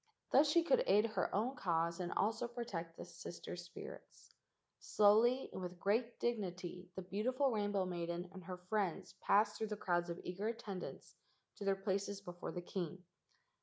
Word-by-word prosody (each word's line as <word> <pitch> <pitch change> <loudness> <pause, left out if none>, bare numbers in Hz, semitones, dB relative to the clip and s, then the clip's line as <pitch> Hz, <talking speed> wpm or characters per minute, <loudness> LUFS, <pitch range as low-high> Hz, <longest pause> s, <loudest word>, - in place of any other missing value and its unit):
Thus 290 +2 +6
she 335 +2 +5
could - - +4
aid 210 +2 +6
her - - +1
own 235 +7 +1
cause 170 -3 +1
and 175 -1 -2
also 225 +3 +1
protect 200 -9 -5
the - - -6
sister 175 0 -7
spirits. 175 0 -10 0.5
Slowly 225 +5 +4
and - - -4
with 180 -1 -5
great 230 +5 +1
dignity 180 -5 -2
the 190 - -4
beautiful 250 +9 +1
rainbow 205 -3 +1
maiden 175 0 -3
and 185 -3 -9
her 185 0 -5
friends 185 0 -1
passed 210 +1 +4
through 220 - 0
the 210 0 -3
crowds 175 -2 +1
of 170 - -4
eager 185 +4 -3
attendants 215 -5 -5 0.4
to 200 - -5
their 195 0 +3
places 195 +1 -1
before 175 -3 -6
the 175 - -5
king. 180 0 -4
195 Hz, 165 wpm, -38 LUFS, 180-220 Hz, 0.5 s, Thus